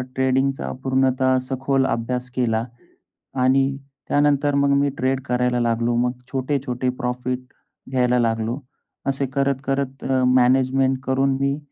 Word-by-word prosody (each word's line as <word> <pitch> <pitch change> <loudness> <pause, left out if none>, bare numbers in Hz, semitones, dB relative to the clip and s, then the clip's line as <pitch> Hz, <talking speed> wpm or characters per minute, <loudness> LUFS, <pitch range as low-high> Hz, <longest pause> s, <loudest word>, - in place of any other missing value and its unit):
ट्रेडिंगचा 135 +1 0
पूर्णतः 130 0 +2
सखोल 135 0 +1
अभ्यास 125 +2 -2
केला. 115 -3 +1 0.8
आणि 135 +1 +3 0.3
त्यानंतर 145 0 +2
मग 140 0 +3
मी 140 0 +2
ट्रेड 130 +1 0
करायला 125 -1 +1
लागलो. 120 0 +1
मग 125 +1 +2 0.2
छोटे-छोटे 130 -2 -1
प्रॉफिट 125 +1 -2 0.5
घ्यायला 125 -1 +2
लागलो. 115 +2 0 0.5
असे 135 0 0
करत, 140 -1 +1
करत 135 -1 -2
अ, 130 -1 +1
मॅनेजमेंट 130 +1 +3
करून 135 +1 +1
मी 140 +1 0
130 Hz, 125 wpm, -22 LUFS, 125-135 Hz, 0.8 s, आणि